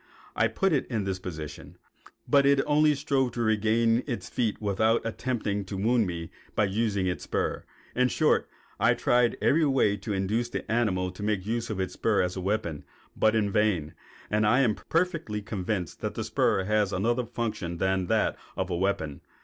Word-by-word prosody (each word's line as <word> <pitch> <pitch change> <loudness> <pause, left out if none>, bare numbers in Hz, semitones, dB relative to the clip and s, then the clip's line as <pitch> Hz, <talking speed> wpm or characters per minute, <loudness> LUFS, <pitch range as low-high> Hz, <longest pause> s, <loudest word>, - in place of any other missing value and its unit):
I - - +3
put 195 -3 0
it 140 - +1
in 110 -5 -2
this 95 -1 -2
position, 75 -5 -8 0.5
but 140 -1 +5
it 140 0 +4
only 150 0 +4
strove 135 -3 0
to 120 - -3
regain 115 +2 +2
its 120 -4 -4
feet 115 -4 -1
without 110 +3 +1
attempting 110 -3 -2
to 95 +1 -5
wound 115 +2 +2
me 85 -2 -5 0.2
by - - +3
using 100 -1 0
its 90 -1 -2
spur. - - -2 0.3
In 125 0 +3
short, - - +2 0.3
I - - +4
tried 120 -1 +2
in - - -11
every 160 +2 +4
way 130 -7 +2
to 105 +2 -6
induce 105 +5 0
the - - -4
animal 95 -6 +1
to 90 - -11
make 105 -3 -1
use 115 +2 -2
of 105 -3 -3
its 95 -1 -2
spur 110 -4 +1
as 90 0 -2
a 95 - -4
weapon, 95 -6 -2 0.3
but 110 0 +3
in 105 -2 +1
vain; 95 -8 +1 0.4
and 105 +1 +2
I 125 +5 +4
am 120 -5 +3
perfectly 165 - -1
convinced 95 -4 -3
that - - -3
the - - -2
spur 95 - +1
has 105 0 +1
another 120 +6 0
function 110 -7 -3
than 95 0 0
that - - +1 0.2
of 95 0 -2
a - - 0
weapon. 85 -6 -1
105 Hz, 190 wpm, -27 LUFS, 95-120 Hz, 0.5 s, but